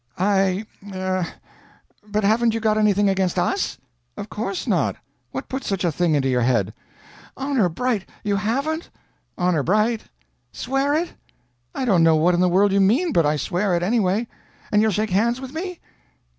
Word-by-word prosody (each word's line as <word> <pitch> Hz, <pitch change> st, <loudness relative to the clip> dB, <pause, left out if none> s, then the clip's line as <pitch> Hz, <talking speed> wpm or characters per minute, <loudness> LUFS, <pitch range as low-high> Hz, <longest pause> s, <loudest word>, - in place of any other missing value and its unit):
"I 195 Hz, +1 st, +1 dB, 0.3 s
er 185 Hz, -1 st, -1 dB, 0.8 s
but 210 Hz, 0 st, -1 dB
haven't 225 Hz, +2 st, +3 dB
you -, -, 0 dB
got 215 Hz, -1 st, +2 dB
anything 205 Hz, -1 st, +3 dB
against 190 Hz, -2 st, 0 dB
us?" 380 Hz, -, 0 dB, 0.4 s
"Of 205 Hz, +1 st, -7 dB
course 200 Hz, -2 st, -3 dB
not. 185 Hz, -, +1 dB, 0.3 s
What 130 Hz, +1 st, -6 dB
put 265 Hz, +1 st, -4 dB
such 195 Hz, -2 st, -2 dB
a 170 Hz, -, +2 dB
thing 165 Hz, 0 st, +1 dB
into 135 Hz, -2 st, +1 dB
your 125 Hz, -2 st, +1 dB
head?" 115 Hz, -5 st, +1 dB, 0.6 s
"Honor 265 Hz, -8 st, +1 dB
bright 220 Hz, +3 st, -2 dB
you 205 Hz, -2 st, 0 dB
haven't? 275 Hz, +11 st, -2 dB, 0.5 s
"Honor 180 Hz, -4 st, +1 dB
bright." 215 Hz, -, +1 dB, 0.5 s
"Swear 270 Hz, +3 st, 0 dB
it!" 335 Hz, +3 st, -1 dB, 0.6 s
"I 265 Hz, -, -1 dB
don't 190 Hz, -8 st, +3 dB
know 165 Hz, -1 st, +5 dB
what 165 Hz, +3 st, +3 dB
in 175 Hz, -, +1 dB
the 180 Hz, 0 st, +3 dB
world 195 Hz, +3 st, +3 dB
you 200 Hz, 0 st, +3 dB
mean, 260 Hz, -, +3 dB
but 165 Hz, -3 st, +3 dB
I 150 Hz, -, +2 dB
swear 180 Hz, +5 st, 0 dB
it, 170 Hz, -, 0 dB
anyway." 210 Hz, +2 st, +1 dB, 0.4 s
"And 210 Hz, -, +4 dB
you'll 220 Hz, -, +3 dB
shake 215 Hz, +1 st, -1 dB
hands 235 Hz, +6 st, +2 dB
with 265 Hz, 0 st, -8 dB
me?" 360 Hz, +2 st, -5 dB
200 Hz, 175 wpm, -22 LUFS, 180-235 Hz, 0.8 s, know